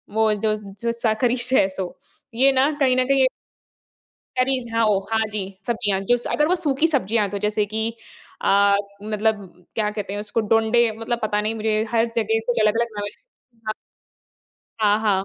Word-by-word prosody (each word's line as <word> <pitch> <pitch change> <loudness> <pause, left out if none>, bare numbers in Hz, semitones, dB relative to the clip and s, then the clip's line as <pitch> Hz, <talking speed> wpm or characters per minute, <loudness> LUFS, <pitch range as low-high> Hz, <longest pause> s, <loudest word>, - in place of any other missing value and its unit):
वो 220 -1 +3
जो 215 +1 0 0.3
जो 235 - 0
साखरी 235 +1 +1
स 250 +2 0 0.2
सो, 185 -2 -4 0.4
ये 265 +3 +5
ना 270 +2 +3
कहीं 260 -2 +4
न 255 - +4
कहीं 275 0 +3
ए - - +6 1.1
करीज़ 255 -2 0
हाँ, 230 0 +3
ओ, 210 -2 +3
हाँ 220 0 +2
जी, 210 -1 -2 0.2
सब्जियाँ 215 -5 0
जो 245 - +6
स 240 - -6
अगर 300 - +2
वो 360 - +3
सूखी 305 -3 +1
सब्जियाँ 230 - +1
तो 200 - -3
जैसे 210 +1 0
कि 220 +2 -2 0.6
अ, 200 0 +5 0.3
मतलब 215 -1 -1 0.3
क्या 215 -2 0
कहते 210 -2 -5
हैं 205 - -3
उसको? 210 +2 -1
डोंडे 225 +2 +3
मतलब 230 +1 -2
पता 210 -1 +1
नहीं 215 +2 -2
मुझे 215 -1 0
हर 230 0 +2
जगह 225 0 +1
कुछ 240 -2 +1
अलग-अलग 225 +2 +2
नाम 205 - -3
है, 205 - -4 0.6
हाँ। 215 - -1 1.1
हाँ, 210 -1 +4
हाँ। 200 -3 +1
220 Hz, 185 wpm, -22 LUFS, 210-240 Hz, 1.1 s, ए